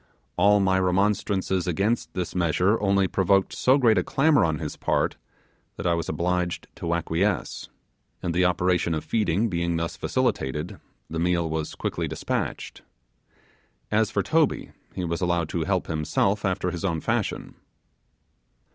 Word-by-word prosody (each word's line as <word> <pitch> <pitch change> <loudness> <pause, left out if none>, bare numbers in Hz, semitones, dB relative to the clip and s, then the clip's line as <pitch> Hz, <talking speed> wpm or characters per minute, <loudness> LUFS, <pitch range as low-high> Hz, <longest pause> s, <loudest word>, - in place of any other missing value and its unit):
All 105 0 +5
my 95 -1 +2
remonstrances 95 0 +1
against 100 +7 0
this 90 -3 -3
measure 90 +5 +2
only 100 -1 +3
provoked 95 +1 +2
so 130 +2 +3
great 115 -7 +4
a - - 0
clamour 145 - +3
on 80 -2 +1
his 75 -1 -5
part, - - 0 0.6
that - - -6
I 85 - +3
was 85 -1 -2
obliged 90 0 -1
to 85 0 -1
acquiesce; 85 +4 -1 0.5
and 85 - -1
the 90 +2 +2
operation 90 -1 +1
of 80 - -3
feeding 105 0 +1
being 85 -3 -1
thus 85 0 -3
facilitated, 75 +6 -1 0.3
the 80 - -4
meal 85 -1 +1
was 80 -1 -3
quickly - - -2
despatched. - - -4 1.1
As 110 0 +2
for 115 - 0
Toby, 160 -2 +1 0.2
he 90 - -2
was 85 +1 -2
allowed 85 -3 0
to 85 -2 -2
help 95 -2 0
himself 85 +6 0
after 90 -1 0
his 90 -1 -6
own 85 -4 0
fashion. - - -2
90 Hz, 150 wpm, -25 LUFS, 85-100 Hz, 1.1 s, All